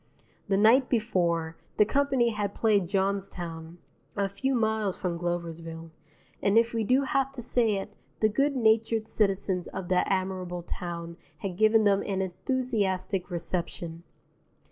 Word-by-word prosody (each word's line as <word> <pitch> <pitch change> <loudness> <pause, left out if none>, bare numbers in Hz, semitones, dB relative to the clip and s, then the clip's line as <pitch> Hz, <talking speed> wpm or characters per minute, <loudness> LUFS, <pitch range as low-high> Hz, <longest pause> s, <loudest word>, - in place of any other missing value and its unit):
The 195 -1 +2
night 235 +6 +5
before, 170 -8 0 0.2
the 210 - +6
company 270 0 +2
had 205 -2 -3
played 205 -5 +2
Johnstown 180 -4 -2 0.4
(a 200 -1 +1
few 265 +7 -1
miles 220 -4 0
from 180 -3 -2
Gloversville), 165 -1 -4 0.5
and 200 +2 +3
if 230 +1 +3
we 225 -1 0
do 255 +5 +3
have 270 0 0
to 260 - -6
say 230 -3 +2
it, 195 +1 -5 0.3
the 215 - +4
good 275 +7 +1
natured 225 -2 +2
citizens 195 -4 0
of 185 -2 -6
that 180 -1 +2
admirable 185 -2 -2
town 170 -1 -6 0.2
had 195 -3 -3
given 220 +2 +4
them 200 -1 +4
an 195 -2 -1
enthusiastic 190 -2 -1
reception. 170 -1 -3
195 Hz, 145 wpm, -28 LUFS, 175-225 Hz, 0.5 s, the